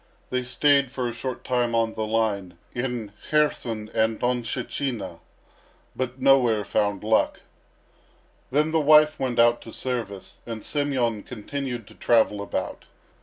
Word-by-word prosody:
They 125 0 +1
stayed 140 +1 +3
for 130 -2 -2
a 120 - -3
short 130 +1 -5
time 120 -2 0
on 115 -1 +1
the 110 0 -3
line, 100 -5 -1 0.2
in 120 -4 -3 0.2
Kherson 120 -8 +1
and 110 0 +1
Donshchina, 120 -5 -2 0.8
but 130 0 -3
nowhere 125 -5 +4
found 100 -1 0
luck. 110 +1 +2 1.1
Then 150 +3 +2
the 160 - +3
wife 150 0 +6
went 125 -2 -1
out 120 0 +5
to 115 - -10
service, 115 -7 -4
and 115 -2 -6
Semyon 130 -7 0
continued 125 +1 -5
to - - -15
travel 110 -3 +2
about. 100 - -4
120 Hz, 135 wpm, -25 LUFS, 110-130 Hz, 1.1 s, wife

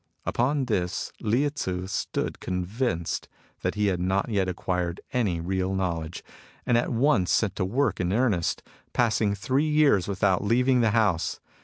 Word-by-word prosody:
Upon 135 +3 +1
this 90 -7 -2
Lieh 125 +7 +1
Tzu 90 -10 -3
stood 95 - -3
convinced 90 0 -2 0.3
that - - -1
he 105 0 +1
had 95 -3 +1
not 95 +5 0
yet 100 -4 +1
acquired 90 -1 -2
any 105 -9 +1
real 95 +2 -1
knowledge, 85 -3 -3 0.4
and 125 - +2
at 120 - +2
once 120 -6 +2
set 100 -3 +2
to 95 - 0
work 120 +2 0
in 90 0 0
earnest, 105 -6 +1 0.3
passing 110 -3 +2
three 135 +9 0
years 150 - +4
without 95 -1 +1
leaving 125 +4 +3
the 115 - +3
house. 105 -6 +1
100 Hz, 155 wpm, -26 LUFS, 90-120 Hz, 0.4 s, years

